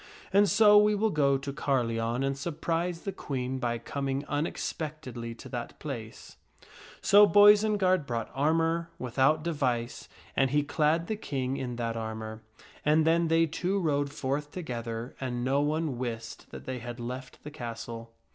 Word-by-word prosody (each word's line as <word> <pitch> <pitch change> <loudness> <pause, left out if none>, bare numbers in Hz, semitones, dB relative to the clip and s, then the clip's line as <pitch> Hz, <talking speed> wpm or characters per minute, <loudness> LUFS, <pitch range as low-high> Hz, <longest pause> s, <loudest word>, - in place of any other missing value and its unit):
And 200 0 +5
so 210 0 +7
we 210 0 +4
will 215 +1 +1
go 140 -4 +3
to 140 +1 -6
Carleon 120 -3 0
and 135 0 0
surprise 165 +3 -2
the 195 - -3
Queen 130 -7 -4
by 120 -1 -1
coming 135 +3 -3
unexpectedly 145 -5 -4
to - - -11
that 120 -2 -6
place." 120 -7 -8 0.6
So 205 +1 +7
Boisenard 205 -5 +5
brought 115 -2 -3
armor, 165 +3 +1
without 135 +5 +2
device, 130 -8 -2 0.3
and 135 -1 +3
he 145 +2 +2
clad 155 +3 +1
the 215 - -2
King 135 - -3
in 125 -3 -4
that 115 -1 -2
armor; 110 -1 -5 0.4
and 155 +1 +4
then 165 +1 +3
they 165 +1 +4
two 180 +5 -1
rode 145 -5 0
forth 145 +1 -2
together, 120 -7 -5
and 120 -2 -2
no 135 +3 +2
one 150 -3 -1
wist 115 -2 -5
that - - -10
they 130 -1 -4
had 120 +1 -7
left 125 +2 -7
the 150 - -8
castle. 115 -3 -7
140 Hz, 155 wpm, -29 LUFS, 120-165 Hz, 0.6 s, so